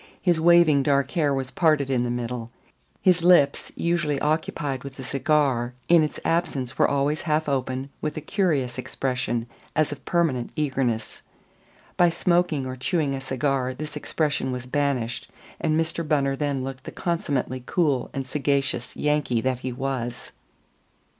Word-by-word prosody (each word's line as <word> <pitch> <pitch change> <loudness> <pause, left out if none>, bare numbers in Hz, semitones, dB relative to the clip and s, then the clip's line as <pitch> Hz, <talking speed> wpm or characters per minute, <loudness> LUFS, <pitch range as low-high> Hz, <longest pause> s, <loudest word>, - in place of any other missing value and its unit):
His 175 -4 +2
waving 170 -4 +6
dark 140 0 +2
hair 155 -6 +1
was 135 -1 -2
parted 155 -5 +2
in 125 -2 +2
the 120 - -1
middle. 120 -1 -3 0.5
His 180 -2 +4
lips, 170 -5 +4
usually 170 -4 0
occupied 150 -3 -1
with 140 -1 -9
a 135 - -7
cigar, 130 -3 +1
in 170 -1 +7
its 155 - -2
absence 140 -7 0
were - - +4
always 140 +2 0
half 155 0 +1
open 130 0 -2
with 155 +1 -3
a - - -3
curious 150 -8 0
expression 125 -3 -2 0.3
as 155 -1 +2
of 145 - -7
permanent 155 -9 0
eagerness. 135 -7 -1 0.8
By 175 -1 +6
smoking 170 -4 +1
or 130 0 -4
chewing 140 +2 0
a 135 - -4
cigar 130 -1 -1
this 150 +2 -6
expression 150 -2 -1
was 125 -1 -4
banished, 130 -3 -1 0.3
and 155 -1 +1
Mr. 165 +1 -1
Bunner 140 -3 +2
then 140 -2 -1
looked 130 0 -6
the - - -6
consummately 140 -7 -2
cool 145 -8 +1
and 135 -1 -4
sagacious 140 -2 -1
Yankee 150 -5 +1
that 130 0 0
he 130 0 -4
was. 125 -2 -4
140 Hz, 155 wpm, -25 LUFS, 130-155 Hz, 0.8 s, in